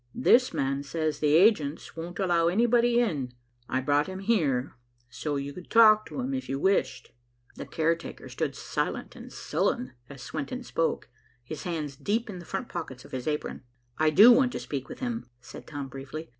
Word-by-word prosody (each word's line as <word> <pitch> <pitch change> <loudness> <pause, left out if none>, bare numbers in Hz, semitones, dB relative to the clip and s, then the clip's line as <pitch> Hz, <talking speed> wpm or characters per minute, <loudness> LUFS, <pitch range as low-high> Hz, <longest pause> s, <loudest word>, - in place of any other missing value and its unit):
This 250 0 +4
man 135 +1 -1
says 155 +1 -2
the 150 0 +3
agents 165 -6 +3
won't 170 +2 -6
allow 175 -4 +2
anybody 235 +5 +3
in. 145 - -1 0.4
I 130 - 0
brought 145 +2 +2
him 190 0 -6
here, 150 - +1 0.4
so 150 +2 -3
you 140 0 -4
could 180 +2 -11
talk 215 -2 +6
to - - -7
him 260 +2 -3
if 260 0 -4
you 135 - -1
wished." 190 +7 0 0.4
The - - -8
caretaker 165 +1 -2
stood - - -3
silent - - -3
and - - -11
sullen 125 +1 -1 0.2
as 135 -3 -10
Swenton 255 - -5
spoke, 165 -8 -1 0.4
his 145 +4 -7
hands 155 -5 -3
deep 220 - -1
in 185 - -8
the 175 - -11
front 195 +5 -4
pockets 135 -7 -7
of - - -15
his 130 +1 -5
apron. 150 -1 -3 0.4
"I 155 0 +4
do 210 +10 +8
want 250 0 +4
to - - -3
speak 135 -2 -5
with - - -9
him," 240 -2 -3
said 125 +2 -12
Tom 145 -3 -5
briefly. 135 +5 -8
165 Hz, 185 wpm, -28 LUFS, 140-220 Hz, 0.4 s, do